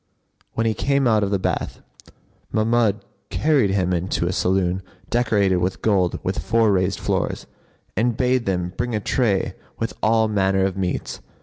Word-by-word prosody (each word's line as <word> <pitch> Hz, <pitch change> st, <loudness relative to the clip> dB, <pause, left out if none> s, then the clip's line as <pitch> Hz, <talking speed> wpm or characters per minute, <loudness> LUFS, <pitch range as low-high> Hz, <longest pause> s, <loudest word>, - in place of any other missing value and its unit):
When 115 Hz, -, 0 dB
he 110 Hz, -, +2 dB
came 140 Hz, +3 st, +1 dB
out 110 Hz, -2 st, +3 dB
of 100 Hz, -, 0 dB
the 100 Hz, -, +1 dB
bath, 95 Hz, -, -2 dB, 0.7 s
Mahmud 110 Hz, -1 st, +1 dB, 0.2 s
carried 145 Hz, -9 st, +2 dB
him 95 Hz, -2 st, +1 dB
into 85 Hz, 0 st, -1 dB
a 90 Hz, -, -1 dB
saloon 95 Hz, 0 st, +1 dB, 0.3 s
decorated 105 Hz, -6 st, +2 dB
with 90 Hz, +1 st, -2 dB
gold 95 Hz, -5 st, +2 dB
with -, -, -2 dB
four 110 Hz, +8 st, +2 dB
raised 95 Hz, 0 st, +1 dB
floors, -, -, -1 dB, 0.5 s
and 115 Hz, +2 st, +1 dB
bade 125 Hz, -2 st, +1 dB
them 90 Hz, -1 st, -1 dB
bring 120 Hz, -1 st, -2 dB
a -, -, +1 dB
tray 105 Hz, -3 st, 0 dB, 0.2 s
with -, -, -3 dB
all 110 Hz, 0 st, +3 dB
manner 95 Hz, -2 st, +2 dB
of 95 Hz, -1 st, -1 dB
meats. 95 Hz, -2 st, -3 dB
100 Hz, 165 wpm, -22 LUFS, 95-115 Hz, 0.7 s, out